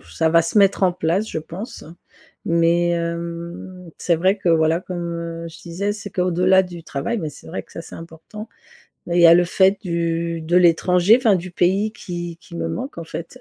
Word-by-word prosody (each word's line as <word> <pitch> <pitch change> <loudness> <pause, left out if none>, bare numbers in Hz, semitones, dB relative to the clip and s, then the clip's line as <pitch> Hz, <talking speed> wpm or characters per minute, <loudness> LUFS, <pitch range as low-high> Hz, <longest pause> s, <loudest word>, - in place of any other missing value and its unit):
ça 85 - -1
va 165 0 +5
se 165 +6 -3
mettre 195 -1 +4
en 180 -1 +4
place 180 +5 -1
je - - -3
pense. 175 +8 -8 0.6
Mais 170 +1 +2
hem, 170 +1 -5
c'est 170 -2 +1
vrai 190 +5 +2
que, 180 - -2
voilà, 160 0 +3
comme 170 -2 -5
je 165 - -13
disais, 190 +4 -3
c'est 210 - -8
qu'au-delà 185 +1 +3
du 175 -2 -9
travail, 145 +12 -3
bah 160 -4 -3
c'est - - -15
vrai 170 - -5
que - - -22
ça 165 - -7
c'est - - -12
important 165 +7 -10 0.6
et 170 - -1
il 175 - +4
y - - +8
a 165 - +9
le 175 0 +4
fait 190 +3 +3
du 170 -2 -2
de 170 +3 -1
l'étranger, 180 +4 +4
enfin, 225 -6 +3
du 180 +1 -4
pays 195 +5 +1
qui 175 -4 -7
qui 170 - -13
me - - -3
manque 255 -8 -5
en - - -6
fait 170 +9 -8
175 Hz, 205 wpm, -21 LUFS, 165-185 Hz, 0.6 s, a